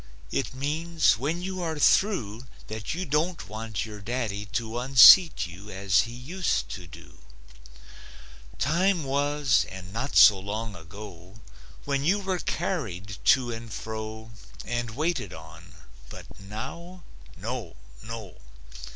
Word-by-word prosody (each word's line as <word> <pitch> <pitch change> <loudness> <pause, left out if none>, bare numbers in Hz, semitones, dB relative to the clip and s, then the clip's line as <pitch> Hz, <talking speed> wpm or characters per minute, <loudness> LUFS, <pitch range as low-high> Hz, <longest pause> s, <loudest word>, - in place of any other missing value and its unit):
It 130 -2 -2
means 155 -2 +1
when 160 +7 -2
you 185 0 -4
are 160 -2 -2
through 130 - +2 0.2
That 110 +7 -5
you 185 +2 -3
don't 155 - -1
want 110 +1 -4
your 105 -2 -9
daddy 110 -2 -3
to 110 +3 -3
Unseat 135 +7 +8
you, 90 +4 -11
as 95 +1 +2
he - - -8
used 125 - -2
to 85 +8 -7
do. 85 0 -14 1.4
Time 175 +4 +1
was, 140 -1 +1
and 95 0 -10
not 125 +6 -3
so 100 -3 +8
long 105 +2 -5
ago, 90 +2 -11 0.5
When 140 -1 -1
you 180 +7 +3
were 190 -2 -2
carried 100 - -3
to 125 -3 +4
and 115 -1 -7
fro 110 +1 -6 0.3
And 120 -1 -2
waited 155 - -2
on, 80 0 -13 0.3
but - - -10
now? 160 - -8 0.3
No! 110 - -5 0.3
No! 110 -5 -8
115 Hz, 130 wpm, -26 LUFS, 100-150 Hz, 1.4 s, Unseat